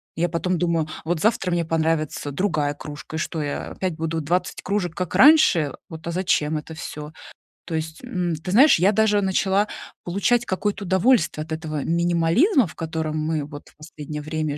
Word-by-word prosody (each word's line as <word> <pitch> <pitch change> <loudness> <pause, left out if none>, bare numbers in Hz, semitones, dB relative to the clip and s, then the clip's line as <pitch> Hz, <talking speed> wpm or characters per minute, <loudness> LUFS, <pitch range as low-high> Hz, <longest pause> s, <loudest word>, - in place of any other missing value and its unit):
Я 170 +2 +1
потом 175 +2 -1
думаю: 170 -3 +1 0.2
вот 165 -1 -1
завтра 205 -4 +1
мне 170 -1 +1
понравится 160 -2 -1
другая 150 -3 0
кружка, 150 +1 -9
и - - -2
что, 160 0 -3
я 145 -1 -4
опять 185 -3 -3
буду 165 0 -2
20 175 +4 -1
кружек, 190 -4 -2
как 180 -2 -3
раньше? 260 - +6 0.2
Вот, 160 -1 -9
а - - -1
зачем 160 -4 +1
это 155 +2 -7
всё? 150 -1 -7 0.5
То 165 - -4
есть, 160 +6 -5
м, 180 -9 -2
ты 160 +4 -6
знаешь, 265 - +6
я 190 +4 +4
даже 210 -1 +3
начала 195 +1 +1 0.4
получать 215 +7 +1
какое-то 205 +1 -2
удовольствие 190 -4 +2
от 160 - -14
этого 155 -2 -4
минимализма, 175 - +3
в - - -13
котором 160 -1 -3
мы 155 -2 -1
вот 145 0 -11
в - - -27
последнее 150 -1 -7
время 155 -1 -3
165 Hz, 180 wpm, -23 LUFS, 155-190 Hz, 0.5 s, раньше